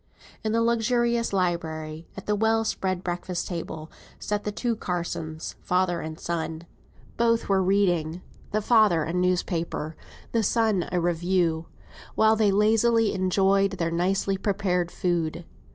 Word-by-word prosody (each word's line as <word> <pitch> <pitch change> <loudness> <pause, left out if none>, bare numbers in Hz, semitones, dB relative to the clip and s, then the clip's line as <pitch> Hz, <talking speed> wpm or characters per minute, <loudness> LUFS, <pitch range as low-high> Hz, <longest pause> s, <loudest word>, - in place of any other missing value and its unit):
In 220 - 0
the 230 +1 +2
luxurious 235 0 +1
library, 165 -4 -2
at 195 - -7
the 210 - +1
well 225 +1 +2
spread 185 -3 -2
breakfast 175 0 -3
table, 160 -3 -6 0.3
sat 210 0 -3
the 210 - -1
two 235 +2 -1
Mr. - - -19
Carsons, 165 -3 -4
father 180 -1 +1
and 155 0 -6
son. 165 -1 -3 0.5
Both 230 0 +2
were 195 -1 +3
reading; 180 -3 +1 0.3
the 215 0 0
father 215 -9 +4
a 165 - -3
newspaper, 175 -3 -1 0.4
the 230 - +2
son 220 -4 +1
a 180 - +1
review, 175 -1 0 0.5
while 220 0 +5
they 215 -2 +3
lazily 225 +2 +3
enjoyed 195 +1 +2
their 165 -3 -1
nicely 190 +3 0
prepared 190 -3 0
food. 170 -2 -1
185 Hz, 140 wpm, -26 LUFS, 170-210 Hz, 0.5 s, while